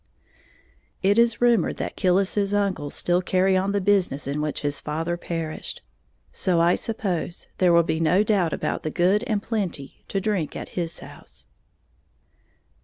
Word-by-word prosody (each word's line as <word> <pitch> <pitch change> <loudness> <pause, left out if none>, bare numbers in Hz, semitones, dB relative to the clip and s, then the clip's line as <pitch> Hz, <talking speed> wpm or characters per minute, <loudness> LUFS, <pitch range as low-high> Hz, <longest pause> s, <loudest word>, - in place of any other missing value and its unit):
It 200 +4 +4
is 235 0 +3
rumored 235 -6 +3
that - - -4
Killis's 195 +2 +1
uncles 190 -8 -1
still 175 +1 +1
carry 190 +1 +2
on 190 +1 +1
the 200 - +1
business 185 -8 +1
in 140 +2 -2
which 150 -1 -2
his 145 -1 -1
father 160 +3 -2
perished; 165 -2 -5 0.5
so 180 -3 +1
I 170 +1 +4
suppose 190 -7 -2
there 180 -2 +4
will 170 0 +5
be 160 -1 -1
no 175 +5 +3
doubt 195 -6 +1
about - - -2
the 155 - -3
"good 185 +6 +2
and 215 -4 -1
plenty" 185 - -4
to 195 - -1
drink 195 -6 -1
at - - -6
his 170 -2 -4
house. - - -12
185 Hz, 160 wpm, -24 LUFS, 165-200 Hz, 0.5 s, will